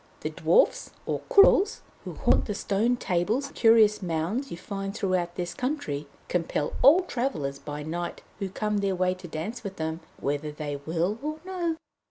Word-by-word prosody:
The - - -3
Dwarfs, - - +3 0.2
or - - -1
Courils, 400 +1 +6 0.2
who - - -6
haunt - - +3
the 210 - -3
stone 220 +5 +1
tables 210 +7 0
and - - -19
curious 225 -2 +5
mounds 180 - -2
you 170 - -6
find 195 +2 -5
throughout 185 -4 0
this 175 -1 -3
country, 250 - -3 0.2
compel 165 -4 -1
all 300 +8 +8
travellers 160 - -2
by 150 0 -6
night 170 +3 -4 0.2
who 195 - -2
come 210 +2 -1
their 195 -1 0
way 185 0 +2
to 185 -1 -10
dance 165 +10 -5
with 195 -2 -5
them, 160 -1 -3 0.2
whether 145 +2 -2
they 150 -1 -4
will 175 +7 0
or 305 +2 -3
no. 350 -3 -1
195 Hz, 175 wpm, -27 LUFS, 165-235 Hz, 0.2 s, all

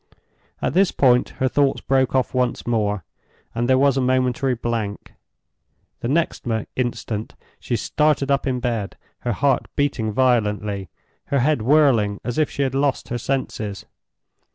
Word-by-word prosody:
At - - 0
this 190 +2 +4
point 125 -2 +3
her 130 - +1
thoughts 140 +1 +2
broke 135 -1 +1
off 130 -2 +1
once 125 -1 0
more, 105 -5 0 0.5
and 120 +1 -1
there 130 - +5
was 140 0 +3
a - - +2
momentary 130 +1 +1
blank. 115 -3 -4 0.9
The - - -3
next 160 +6 0 0.3
instant 115 -3 -3 0.2
she 120 - -2
started 140 +4 +1
up 140 0 +1
in 125 -1 0
bed; 115 -5 -3 0.2
her 120 - -2
heart 135 +5 +1
beating 140 -7 0
violently, 105 -5 +1 0.4
her 140 -2 +1
head 145 -2 +2
whirling 120 -6 +3
as 120 +5 -2
if 155 - +2
she 140 - -2
had 130 -1 -1
lost 140 -1 0
her 120 - -2
senses. 110 -6 -3
125 Hz, 155 wpm, -22 LUFS, 115-135 Hz, 0.9 s, there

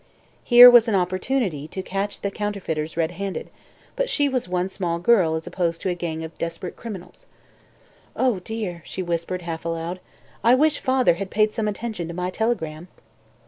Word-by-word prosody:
Here 245 0 +10
was 240 -1 +8
an 220 - +1
opportunity 185 - -1
to 190 +4 -5
catch 195 +2 -3
the 200 - -2
counterfeiters 180 -7 -3
redhanded, 175 +4 -3 0.4
but - - -1
she 290 -1 +2
was 255 -8 -2
one 180 0 0
small 180 -3 -2
girl 175 -3 +3
as 160 - -4
opposed 175 -2 -1
to 190 - 0
a - - +1
gang 165 -2 -4
of 160 0 -8
desperate 170 +2 -4
criminals. 205 -6 -9 0.9
"Oh, 250 -7 +1
dear!" 185 -3 -5
she 185 - -5
whispered, 175 +1 -3
half 165 -1 -5
aloud, 165 +2 -4 0.4
"I 235 +2 +6
wish 300 +2 +2
father 260 -6 +3
had 195 +3 -5
paid 215 +1 +2
some 220 -2 -1
attention 210 -4 -4
to 170 - -7
my 180 +1 -2
telegram." 180 -7 -2
185 Hz, 175 wpm, -23 LUFS, 170-220 Hz, 0.9 s, Here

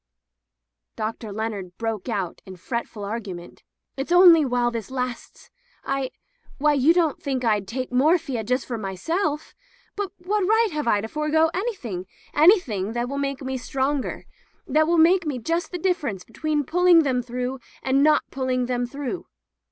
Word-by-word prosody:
Dr. 220 0 -4
Leonard 200 -4 -4
broke 225 -1 -3
out 195 -6 -3
in 190 - -8
fretful 225 +2 -5
argu 205 -2 -4
ment: 175 0 -12 0.3
"It's 270 +5 -4
only 350 -3 +8
while 245 -2 +1
this 230 -4 -5
lasts. 250 -2 -5 0.3
I 275 -1 -1 0.3
— 480 - -27
^why, 295 0 +3
you 300 +6 +6
don't 335 -4 +1
think 265 -2 -2
Fd 210 -4 +1
take 255 +5 -4
morphia 275 -2 +2
just 250 +4 0
for 235 -3 -4
my 195 -2 -4
self! 315 - -2 0.4
But 405 -2 -3
what 390 +3 -1
right 445 +3 +3
have 300 -4 -3
I 205 -3 +3
to 220 - -4
forego 305 +4 +1
any 435 +5 -1
thing 190 - -6 0.2
— - - -28
anything 290 - +4
that 240 +1 -2
will 280 +1 -3
make 275 -1 -2
me 260 0 -3
stronger 270 +2 -2 0.2
— - - -39
that 310 +1 +3
will 340 +1 +3
make 340 +1 +5 0.2
just 335 +5 -1
the 360 - -3
difference 305 - -1
between 300 - -2
pulling 350 +2 +5
them 255 -3 +1
through 250 +2 -4 0.2
and 265 +1 +2
not 300 +1 +4
pulling 255 -2 -1
them 245 0 -1
through?" 285 +6 -5
265 Hz, 175 wpm, -24 LUFS, 230-320 Hz, 0.4 s, only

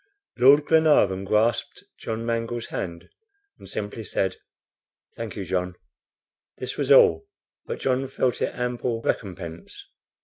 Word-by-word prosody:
Lord 140 +4 +7
Glenarvan 150 - +3
grasped 110 +3 0 0.2
John 115 +1 -4
Mangles' 115 0 -2
hand, 85 -1 -5 0.5
and - - -13
simply 105 +2 -5
said: 95 -1 -1 0.8
"Thank 115 -2 -6
you, 100 - -5
John." 90 0 -2 0.8
This - - -5
was - - -2
all, 80 0 +6 0.4
but - - -4
John 130 0 0
felt 130 -1 -1
it - - -1
ample 120 -1 -2
recompense. 85 -5 -5
115 Hz, 125 wpm, -25 LUFS, 95-125 Hz, 0.8 s, Lord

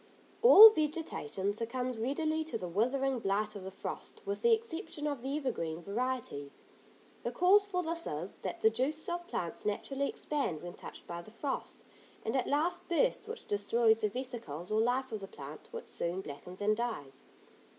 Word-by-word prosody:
All 445 -2 +12
vegetation 300 - -1
succumbs 240 +2 -3
readily 310 +6 0
to 320 - -3
the 180 - -5
withering 255 +8 +1
blight 210 +1 0
of 200 - -7
the 190 - -5
frost 195 - -7
with 200 0 -3
the 470 - +4
exception 405 -8 -1
of 285 -4 -2
the 270 +3 -1
evergreen 170 - -3
varieties. 220 - -3 0.6
The - - -2
cause 395 +3 +5
for 360 -3 -1
this 335 0 -2
is, 160 +6 -4
that - - -5
the 220 - +5
juices 275 +7 -1
of 345 0 -3
plants 170 - -3
naturally 270 +7 -1
expand 275 - -2
when 175 0 -6
touched - - -10
by 170 0 -5
the 195 - -13
frost, 265 +5 -4 0.4
and 225 - -1
at 260 - +1
last 345 +5 0
burst, 430 +4 +2
which 455 +1 -7
destroys 220 +2 +3
the 215 - +2
vesicles 225 - -5
or 215 +1 +3
life 250 +2 +1
of 220 - -3
the 195 - -7
plant, 145 -2 -10
which - - -8
soon 175 +3 -2
blackens 180 +4 -9
and 215 +1 +2
dies. 225 - -4
240 Hz, 180 wpm, -32 LUFS, 200-305 Hz, 0.6 s, All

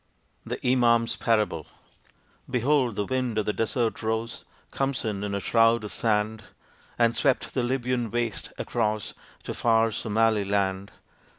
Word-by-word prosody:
THE - - -5
IMAM'S 120 -2 +3
PARABLE 105 -8 0 0.8
Behold, 125 -2 +2
the 100 - -1
wind 125 -3 -1
of 105 - +1
the 105 - 0
Desert 115 0 -1
rose, 110 +1 -3 0.3
Khamsin, 120 -7 -2
in 100 -1 -2
a - - -1
shroud 115 +2 +3
of 105 - -7
sand, 110 -1 0 0.5
And 115 -1 +3
swept 135 -3 +1
the 130 - 0
Libyan 120 -1 -1
waste, 120 -1 -2
across 105 -1 -1 0.3
To - - -4
far 115 -1 +2
Somali 110 0 +1
land. 100 -1 -1
115 Hz, 135 wpm, -26 LUFS, 105-120 Hz, 0.8 s, IMAM'S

